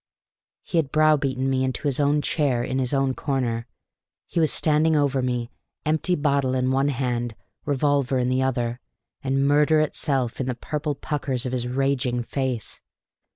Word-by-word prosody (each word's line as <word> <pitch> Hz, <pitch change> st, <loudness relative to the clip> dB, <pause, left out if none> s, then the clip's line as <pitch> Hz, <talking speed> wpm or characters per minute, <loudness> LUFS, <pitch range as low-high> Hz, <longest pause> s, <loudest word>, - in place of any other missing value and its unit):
He 170 Hz, -, 0 dB
had 140 Hz, -4 st, -1 dB
browbeaten 145 Hz, -4 st, +2 dB
me 130 Hz, -1 st, +1 dB
into 130 Hz, -1 st, -2 dB
his 140 Hz, -3 st, +1 dB
own 145 Hz, +1 st, +2 dB
chair 135 Hz, -6 st, +1 dB
in 130 Hz, +2 st, -2 dB
his 125 Hz, -2 st, 0 dB
own 135 Hz, -2 st, +1 dB
corner; 125 Hz, -4 st, -2 dB, 0.6 s
he -, -, -2 dB
was 160 Hz, -2 st, +3 dB
standing 155 Hz, +1 st, +3 dB
over 140 Hz, -3 st, +2 dB
me, 125 Hz, -1 st, -2 dB, 0.3 s
empty 155 Hz, +4 st, +1 dB
bottle 140 Hz, -3 st, +1 dB
in 130 Hz, 0 st, +1 dB
one 135 Hz, +1 st, +2 dB
hand, 120 Hz, -4 st, -1 dB, 0.3 s
revolver 140 Hz, -2 st, +1 dB
in 125 Hz, -1 st, +1 dB
the 130 Hz, +1 st, +1 dB
other, 120 Hz, -2 st, -1 dB, 0.4 s
and 135 Hz, +1 st, +1 dB
murder 150 Hz, +2 st, +4 dB
itself 135 Hz, -5 st, 0 dB
in 130 Hz, -, -2 dB
the 125 Hz, -, -1 dB
purple 150 Hz, +3 st, -3 dB
puckers 135 Hz, -3 st, -2 dB
of 125 Hz, -, -2 dB
his 125 Hz, -1 st, -1 dB
raging 130 Hz, -1 st, 0 dB
face. 130 Hz, -2 st, -3 dB
135 Hz, 165 wpm, -24 LUFS, 125-145 Hz, 0.6 s, murder